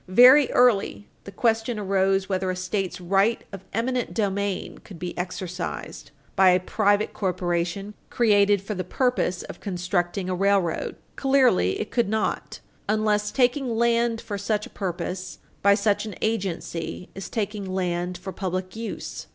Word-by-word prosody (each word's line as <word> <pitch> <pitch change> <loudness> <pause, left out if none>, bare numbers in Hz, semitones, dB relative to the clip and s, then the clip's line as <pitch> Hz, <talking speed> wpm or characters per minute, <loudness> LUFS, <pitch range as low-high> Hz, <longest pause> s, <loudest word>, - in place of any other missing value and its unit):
Very 250 +9 +7
early 225 -4 +3 0.2
the 200 - -8
question 225 +2 0
arose 195 -1 +1
whether 190 -1 -1
a 185 - -1
State's 185 0 -2
right 195 +5 +2
of 195 -2 -8
eminent 245 +2 -1
domain 200 -2 -1
could 190 - -12
be 175 +1 -5
exercised 180 0 -5 0.3
by 190 -1 +6
a 180 0 +5
private 205 +2 +1
corporation 180 +1 -2 0.2
created 205 -4 +3
for 210 - -4
the 185 -2 -3
purpose 215 -3 0
of - - -9
constructing 180 -1 -2
a 185 - -1
railroad. 195 -2 +1 0.2
Clearly 260 - +3
it - - -4
could 235 -5 +1
not 220 0 -2 0.3
unless 210 -1 +2
taking 250 0 +1
land 235 0 +2
for 205 -2 -5
such 210 +1 -1
a - - -13
purpose 185 -1 -4 0.2
by 200 0 +5
such 205 +1 +1
an 210 - -7
agency 185 -5 -3
is 195 -2 -7
taking 205 -3 -3
land 180 -1 -1
for 190 +2 -7
public 185 0 -3
use. 225 0 -6
200 Hz, 150 wpm, -25 LUFS, 185-220 Hz, 0.3 s, Very